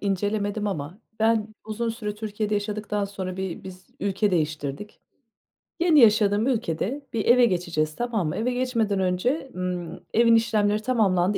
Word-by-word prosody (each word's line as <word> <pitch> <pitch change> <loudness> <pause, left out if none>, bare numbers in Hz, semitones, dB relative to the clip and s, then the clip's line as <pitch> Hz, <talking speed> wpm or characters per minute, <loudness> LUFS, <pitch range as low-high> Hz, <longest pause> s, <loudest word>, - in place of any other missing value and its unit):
incelemedim 205 +1 -1
ama 175 +1 -4 0.2
ben 220 -1 +2
uzun 220 +2 -3
süre 220 -2 -4
Türkiye'de 210 0 -3
yaşadıktan 210 0 -2
sonra 190 -2 -5
bir 190 -2 -5
biz 185 -1 -10
ülke 200 +1 +1
değiştirdik. 155 +2 -3 0.8
Yeni 335 -3 +5
yaşadığım 215 -1 +5
ülkede 235 - -1
bir 225 -2 -1
eve 245 +1 +6
geçeceğiz, 170 -6 -1
tamam 230 -8 -1
mı? 150 - -2
Eve 235 +3 0
geçmeden 230 -6 0
önce, 240 - 0
ımm, 180 -2 -4
evin 230 0 +5
işlemleri 215 -2 +2
tamamlandı, 200 -5 +2
210 Hz, 140 wpm, -25 LUFS, 185-225 Hz, 0.8 s, eve